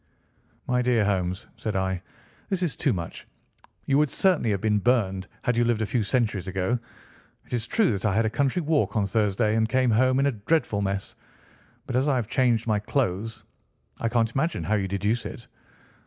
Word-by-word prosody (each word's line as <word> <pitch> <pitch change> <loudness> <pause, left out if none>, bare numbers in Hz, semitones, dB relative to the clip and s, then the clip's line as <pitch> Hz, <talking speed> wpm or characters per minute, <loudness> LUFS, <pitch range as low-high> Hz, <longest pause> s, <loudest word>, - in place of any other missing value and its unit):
"My 125 0 +1
dear 120 -4 +2
Holmes," 95 -1 -1
said 110 - -3
I, 95 -1 -1 0.5
"this 185 -2 0
is 170 - -1
too 145 - +1
much. 85 -6 -5 0.6
You 140 0 +3
would 150 -1 +3
certainly 180 -10 +2
have 100 -2 +1
been 105 -1 +2
burned, 100 -5 +1 0.2
had 125 - +1
you 120 - +3
lived 115 -2 +1
a - - +1
few 120 +3 0
centuries 105 -3 0
ago. 95 +6 0 0.7
It - - -11
is 120 -1 -1
true 220 -6 +2
that 100 0 -2
I 100 -2 +2
had 110 +1 +3
a - - +2
country 140 +8 0
walk 155 -4 +1
on 105 -2 +2
Thursday 105 +1 +1
and 110 0 +2
came 130 0 +2
home 130 +4 +3
in 140 - +3
a 140 - +3
dreadful 110 -1 0
mess, 95 0 -2 0.7
but - - -4
as 130 +3 +2
I 140 - +3
have 120 -4 -1
changed 120 -3 +2
my 110 -2 +1
clothes 105 -2 -2 0.6
I 115 - 0
can't 115 -1 +1
imagine 155 +5 -1
how 110 - -1
you 100 -3 +1
deduce 105 +4 -1
it. 120 - -9
115 Hz, 200 wpm, -26 LUFS, 100-130 Hz, 0.7 s, You